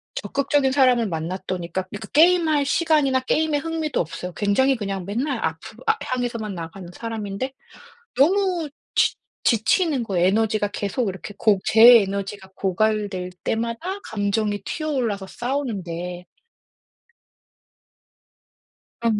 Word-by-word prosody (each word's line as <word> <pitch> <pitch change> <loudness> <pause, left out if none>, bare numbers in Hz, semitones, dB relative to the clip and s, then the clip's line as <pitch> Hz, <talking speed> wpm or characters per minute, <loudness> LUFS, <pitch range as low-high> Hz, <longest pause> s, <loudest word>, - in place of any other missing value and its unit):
적극적인 280 -1 +1
사람을 255 -4 +4
만났더니까 175 +1 -3
그 195 +3 -9
그 220 - -9
게임할 315 -2 +4
시간이나 295 -3 +2
게임에 305 +3 +1
흥미도 320 -1 -2
없어요. 175 +2 -4
굉장히 260 +7 +2
그냥 195 -5 -4
맨날 245 +6 -1
앞으로 165 +9 -5
앞 - - +3
향해서만 240 -6 -3
나가는 170 +2 -8
사람인데 225 +3 -4 0.6
너무 355 +1 +3 0.3
지 - - +4 0.3
지치는 255 - +2
거예요. 185 -4 +1
에너지가 215 +1 +1
계속 205 +2 -2
이렇게 190 +2 -7
고 205 -4 +3
제 230 +1 +8
에너지가 195 0 -4
고갈될 195 -1 -1
때마다 235 - -2
감정이 205 0 -1
튀어 310 -1 -3
올라서 225 -9 -1
싸우는데 185 -10 -4 2.7
그럼요. 230 -2 +1
220 Hz, 305 characters per minute, -23 LUFS, 195-270 Hz, 2.7 s, 제